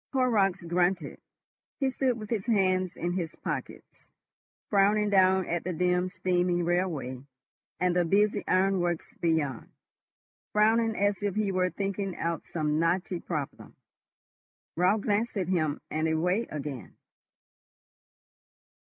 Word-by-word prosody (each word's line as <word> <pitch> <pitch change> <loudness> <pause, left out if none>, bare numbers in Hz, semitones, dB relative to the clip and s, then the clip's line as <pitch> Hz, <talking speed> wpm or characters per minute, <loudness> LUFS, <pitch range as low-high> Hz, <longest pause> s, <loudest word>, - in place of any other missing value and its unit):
Horrocks 220 -9 +2
grunted. 175 -2 0 0.6
He 270 -2 +1
stood 255 -2 0
with 215 -1 -9
his 220 -2 -2
hands 185 -5 +1
in 175 - -2
his 170 -3 -3
pockets, - - -6 0.6
frowning 205 +1 +3
down 190 -1 +4
at 170 -1 -2
the 180 - -3
dim 180 +2 +1
steaming 180 -2 0
railway 165 -8 -1 0.6
and 180 -1 +1
the 180 - +3
busy 205 +4 +2
ironworks 185 -3 +1
beyond, 160 -7 -1 0.8
frowning 225 +1 +3
as 205 -1 +1
if 205 -2 -1
he 210 -2 0
were 185 -1 +1
thinking 195 0 -3
out 165 -2 -3
some 155 -2 -1
knotty 175 +2 0
problem. 150 -6 -5 1.0
Raut 185 +5 +2
glanced 210 +2 0
at 185 -3 -1
him 155 -5 0
and 155 +1 0
away 180 +8 +1
again. 145 -3 -6
185 Hz, 125 wpm, -28 LUFS, 170-205 Hz, 1.0 s, down